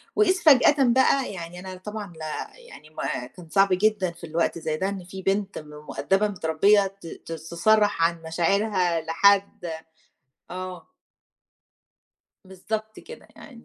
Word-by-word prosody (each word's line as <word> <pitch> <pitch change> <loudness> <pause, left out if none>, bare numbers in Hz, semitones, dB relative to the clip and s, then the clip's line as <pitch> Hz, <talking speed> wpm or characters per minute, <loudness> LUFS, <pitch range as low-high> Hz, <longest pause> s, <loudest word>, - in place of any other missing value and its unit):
وإذ 410 -3 +4
فجأةً 290 -1 +6
بقى 260 0 +3
يعني 175 -1 -8
أنا 185 0 -8
طبعًا 205 0 -7
لا 155 - -6
يعني 480 - -15
ما 125 -5 -4
كان 170 +4 -15
صعب 195 +4 +4
جدًا 195 -1 +2
في 170 - -18
الوقت 165 +1 -1
زي 155 -1 -2
ده 190 +4 -1
إن 195 -2 -6
فيه 190 +1 -9
بنت 195 0 -1
م 150 - -13 0.2
مؤدبة 195 +2 +1
متربية 195 +2 +2
ت 165 - -9
ت 165 - -10
تصرَّح 170 +4 +1
عن 165 0 +1
مشاعرها 175 +1 +1
لحد، 195 +4 +2 0.9
آه. 185 0 -7 1.6
بالضبط 215 +3 -6
كده 475 - -13
يعني 240 -5 -14
190 Hz, 140 wpm, -25 LUFS, 170-210 Hz, 1.6 s, فجأةً